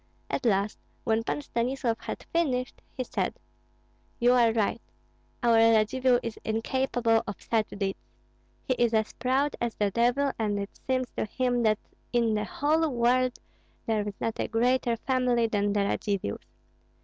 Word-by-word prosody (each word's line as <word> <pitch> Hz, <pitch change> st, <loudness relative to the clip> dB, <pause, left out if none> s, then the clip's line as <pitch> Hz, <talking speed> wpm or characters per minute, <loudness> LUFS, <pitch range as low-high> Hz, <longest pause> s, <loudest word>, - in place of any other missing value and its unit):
At 255 Hz, -, 0 dB
last, 200 Hz, 0 st, +1 dB, 0.2 s
when 225 Hz, 0 st, +1 dB
Pan 290 Hz, -, -2 dB
Stanislav 240 Hz, -2 st, -1 dB
had -, -, -6 dB
finished, 260 Hz, -7 st, 0 dB, 0.2 s
he 255 Hz, -, 0 dB
said, 195 Hz, -6 st, -2 dB, 0.8 s
"You 245 Hz, +1 st, +4 dB
are 235 Hz, -2 st, +5 dB
right! 220 Hz, -2 st, 0 dB, 0.6 s
Our 235 Hz, -1 st, +5 dB
Radzivill 230 Hz, +3 st, +4 dB
is 230 Hz, -, -5 dB
incapable 230 Hz, 0 st, +1 dB
of 205 Hz, -, -5 dB
such 220 Hz, -2 st, 0 dB
deeds. 195 Hz, -1 st, -3 dB, 0.6 s
He 255 Hz, -, +1 dB
is 235 Hz, -1 st, +3 dB
as 220 Hz, -1 st, 0 dB
proud 265 Hz, +4 st, 0 dB
as 235 Hz, -1 st, -1 dB
the 205 Hz, -1 st, 0 dB
devil, 245 Hz, +5 st, +2 dB
and 210 Hz, -2 st, 0 dB
it 200 Hz, 0 st, -4 dB, 0.2 s
seems 255 Hz, -2 st, 0 dB
to -, -, 0 dB
him 245 Hz, +2 st, 0 dB
that 215 Hz, -2 st, +3 dB, 0.3 s
in 235 Hz, -2 st, +2 dB
the 210 Hz, 0 st, 0 dB
whole 310 Hz, +7 st, +1 dB
world 250 Hz, 0 st, +2 dB, 0.5 s
there 215 Hz, -2 st, 0 dB
is 200 Hz, -, -6 dB
not 225 Hz, -, -2 dB
a -, -, 0 dB
greater 240 Hz, 0 st, +1 dB
family 250 Hz, -1 st, +1 dB
than 205 Hz, -2 st, 0 dB
the 205 Hz, 0 st, +1 dB
Radzivills. 200 Hz, -, -1 dB
235 Hz, 160 wpm, -28 LUFS, 215-255 Hz, 0.8 s, are